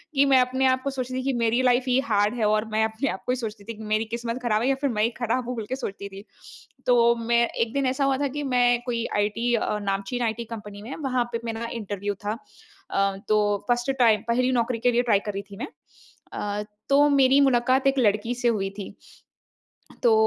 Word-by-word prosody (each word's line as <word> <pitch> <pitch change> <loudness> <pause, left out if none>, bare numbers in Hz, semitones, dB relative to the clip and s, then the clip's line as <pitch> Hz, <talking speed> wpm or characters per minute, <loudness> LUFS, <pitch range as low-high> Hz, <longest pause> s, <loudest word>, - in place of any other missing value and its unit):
कि 275 +1 +5
मैं 260 - +7
अपने 260 +1 0
आप 260 0 +2
को 275 - -1
सोचती 255 -2 -4
थी 260 - -2
कि 270 0 0
मेरी 230 +2 +2
लाइफ 250 0 +3
ही 255 +1 +3
हार्ड 210 +2 +2
है 215 - +2
और 215 +1 +2
मैं 220 +1 +2
अपने 220 +5 -2
आप 190 - -5
को - - 0
ही 250 - +1
सोचती 220 -4 -6
थी 230 - -6
कि 220 - -9
मेरी 215 +1 +1
किस्मत 235 +1 -4
खराब 215 -3 +1
है 245 - +1
या 270 - +3
फिर 280 - +1
मैं 215 -2 0
ही 230 - +3
खराब 240 +2 0
हूँ, 250 - -3
बोल 225 -2 -4
के 260 - -1
सोचती 200 -6 -6
थी। 195 +1 -11 0.6
तो 235 -1 +4
मैं 235 0 +2
एक 230 0 -2
दिन 275 -1 0
ऐसा 265 +2 +1
हुआ 270 -1 +2
था, 285 +1 0
कि 290 +2 -4
मैं 245 -2 +2
कोई 235 -1 -2
आईटी, 230 +4 +1
नामचीन 200 +3 -2
आईटी 225 0 -1
कंपनी 210 -2 -8
में 235 +6 -7
वहाँ 255 -2 +1
पे 230 - -1
मेरा 230 0 -3
इंटरव्यू 205 -2 -3
था। 210 +2 -1 0.5
अ, 195 0 +1
तो 215 - +3 0.3
फर्स्ट 240 +1 +1
टाइम, 220 -4 +5
पहली 250 +2 +2
नौकरी 240 -1 0
के 245 +1 +3
लिए 240 0 +3
ट्राई 225 -5 +3
कर 210 0 -5
रही 195 - -3
थी - - -8
मैं - - -4 0.7
अ, 205 0 -3 0.3
तो 285 +1 +5
मेरी 275 -1 +5
मुलाकात 260 0 +3
एक 275 0 +2
लड़की 215 0 +2
से 245 0 -1
हुई 205 -4 +1
थी 200 - -6 1.1
तो, 235 - +5
235 Hz, 235 wpm, -25 LUFS, 215-255 Hz, 1.1 s, मैं